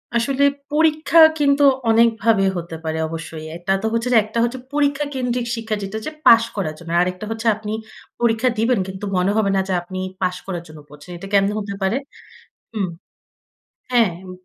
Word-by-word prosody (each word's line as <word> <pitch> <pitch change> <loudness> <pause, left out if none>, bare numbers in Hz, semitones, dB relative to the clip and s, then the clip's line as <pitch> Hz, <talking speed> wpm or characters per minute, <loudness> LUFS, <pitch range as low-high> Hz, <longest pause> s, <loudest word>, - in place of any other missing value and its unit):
আসলে 265 +4 +1 0.3
পরীক্ষা 315 +1 +2 0.2
কিন্তু 285 0 +3 0.3
অনেকভাবে 225 -2 +3
হতে 170 -1 -6
পারে 160 0 -2
অবশ্যই। 160 -1 -7
এটা 175 +2 -3
তো - - -4
হচ্ছে 230 +2 0
যে, - - +6
একটা 220 +2 -3
হচ্ছে 240 +2 -2
পরীক্ষা 290 0 +1
কেন্দ্রিক 250 -2 -2
শিক্ষা 225 -1 -3
যেটা 195 +2 -6
হচ্ছে, 220 +8 -6
পাশ 230 0 +8
করার 180 -7 -2
জন্য। 170 -1 -11
আরেকটা 180 +3 -2
হচ্ছে 225 +1 -3
আপনি 210 0 -7 0.5
পরীক্ষা 235 +1 +2
দিবেন 230 +1 +2
কিন্তু 190 +2 -6
মনে 180 +2 +2
হবে 215 -2 +2
না - - +2
যে, 190 - -1
আপনি 185 +2 -7 0.2
পাশ 185 -1 0
করার 175 -3 -5
জন্য 155 -1 -12
পড়ছেন। 150 +4 -13
এটা 195 - -9
ক্যামনে 200 +1 +3
হতে 200 -1 -5
পারে 190 +6 +1 0.8
হুম, 205 -4 -1 1.0
হ্যাঁ, 240 -4 +4
এম 185 - -10
215 Hz, 180 wpm, -20 LUFS, 185-240 Hz, 1.0 s, পাশ